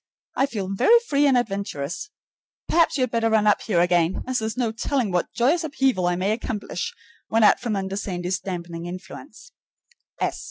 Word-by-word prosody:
I 270 - +2
feel 210 -8 -4
very 450 - +6
free 285 -3 +3
and 265 -2 +4
adventurous. 200 - -3 0.6
Perhaps 330 -4 +3
you - - -1
had 255 -2 +1
better 230 -1 +1
run 220 -1 +3
up 210 - +4
here 190 -6 0
again, 175 0 +2
as 255 -1 -1
there's 220 +2 -3
no 240 -3 0
telling 240 -1 -1
what 180 -1 -1
joyous 295 +8 +2
upheaval 270 - +1
I 175 - +1
may 190 +3 0
accomplish 220 -1 -3 0.4
when 225 0 +2
out - - +6
from 235 -3 -2
under 190 0 -3
Sandy's 180 -2 -2
dampening 175 -2 -6
influence. 185 - -10
215 Hz, 175 wpm, -24 LUFS, 185-255 Hz, 0.6 s, very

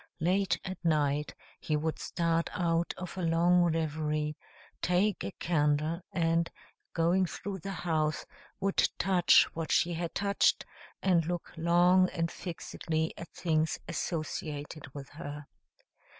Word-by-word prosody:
Late 180 +1 +1
at 185 -2 -6
night, 150 -2 +1 0.2
he 155 - 0
would 155 +1 -2
start 170 -1 0
out 170 -1 +1
of 185 0 -6
a - - -1
long 170 +1 +4
reverie, 150 -1 -1 0.5
take 185 +3 +1
a 100 - -2
candle, 155 +1 +1
and, 165 -1 +1 0.4
going 175 +2 +2
through 195 +3 -5
the 195 - -6 0.2
house, 155 -2 0 0.3
would 195 0 +2
touch 180 -1 +5
what 165 -1 -3
she 175 - +3
had 170 0 -4
touched, 200 0 +2 0.4
and 170 -4 +3
look 175 -1 -4
long 175 +2 +4
and 165 0 -2
fixedly 160 -2 -3
at 170 - -9
things 160 -2 0
associated 155 -3 -4
with 140 -1 -7
her. 145 -1 -7
165 Hz, 130 wpm, -30 LUFS, 155-175 Hz, 0.5 s, touch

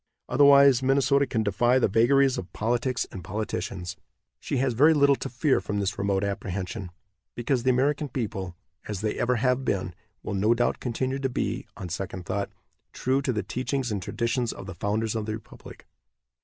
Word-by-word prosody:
Otherwise 140 -1 +6
Minnesota 140 +1 +3
can 110 -3 0
defy 120 +4 +2
the 130 - +3
vagaries 130 +6 +3
of 90 - -8
politics 120 +3 0
and 90 - -8
politicians. 90 -2 -4 0.4
She - - -3
has 130 -1 +1
very 150 +7 +5
little 140 -1 +5
to - - -5
fear 130 0 +1
from 100 +2 -3
this 100 0 -2
remote 100 -1 +1
apprehension, 100 0 -4 0.5
because 120 +1 0
the 130 - +1
American 140 +4 +1
people, 95 -8 -4 0.3
as 105 -3 -4
they 110 -1 0
ever 125 +1 +2
have 125 +2 +1
been, 95 -7 -1 0.3
will - - -4
no 105 +4 +3
doubt 120 +1 0
continue 130 +2 -2
to 135 -1 -1
be, - - -2
on 90 - -6
second 90 +1 -5
thought, 100 +3 -2 0.4
true 130 +2 0
to 130 - 0
the 110 -3 -2
teachings 130 -1 -2
and 100 -2 -2
traditions 115 +4 -1
of - - -9
the 95 - -7
founders 105 +5 -1
of 110 -2 -3
the 110 - -2
republic. 110 - -11
115 Hz, 185 wpm, -26 LUFS, 100-130 Hz, 0.5 s, Otherwise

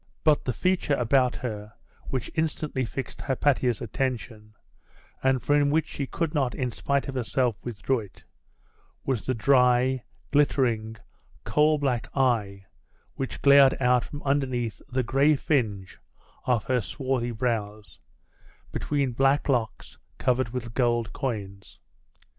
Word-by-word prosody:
Put 155 -2 +3
the 125 - 0
feature 180 +1 +1
about 125 0 +2
her 105 -3 -6 0.3
which 130 -3 -3
instantly 155 -4 -1
fixed 130 +2 -6
Hypatia's 130 -3 +1
attention, 115 -5 -4 0.7
and 130 -1 +1
from 145 0 +3
which 155 +2 +2
she 140 - -4
could 165 +2 -2
not 135 -5 0
in 125 -2 -2
spite 140 +4 -1
of 135 - -4
herself 125 -1 0
withdraw 120 +2 -1
it, 100 -5 -12 0.8
was 130 -5 0
the 130 - -2
dry, 125 +1 +3 0.3
glittering, 120 -6 +1 0.5
coal 150 +9 +3
black 130 -5 -1
eye 110 -8 0 0.5
which 135 - -5
glared 140 -1 +7
out 125 -1 +3
from 145 - -8
underneath 130 -5 -1
the 130 +1 0
gray 135 +5 +3
fringe 105 -11 -1 0.5
of 120 -5 +1
her 125 -2 +1
swarthy 130 +1 -2
brows, 110 -3 -3 0.7
between 140 -3 -1
black 135 +4 +2
locks 120 -5 -2 0.2
covered 125 -1 +1
with 120 -1 -5
gold 120 -3 +1
coins. 100 -8 -5
130 Hz, 130 wpm, -26 LUFS, 115-140 Hz, 0.8 s, glared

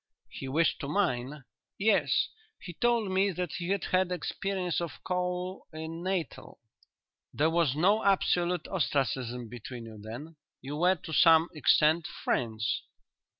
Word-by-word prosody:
"He 135 - -7
wished 160 +5 +1
to 140 - -4
mine?" 140 -5 -1 0.3
"Yes. 215 +2 +2 0.3
He 175 - -8
told 235 0 +1
me 190 +2 +3
that 180 -1 -3
he 175 0 -4
had 200 -1 0
had 185 0 +1
experience 180 +1 -2
of 170 - -5
coal 180 0 -3
in 160 +1 -6
Natal." 185 -4 -4 0.7
"There 155 +2 +1
was 165 -5 +2
no 200 +8 +3
absolute 180 -3 +2
ostracism 125 - -1
between 120 +1 -8
you 110 -2 -10
then? 145 +10 -8 0.2
You 145 +3 -6
were 180 +3 +4
to 160 -1 -9
some 165 0 +6
extent 155 +1 +3
friends?" 110 -3 -1
165 Hz, 140 wpm, -29 LUFS, 140-185 Hz, 0.7 s, some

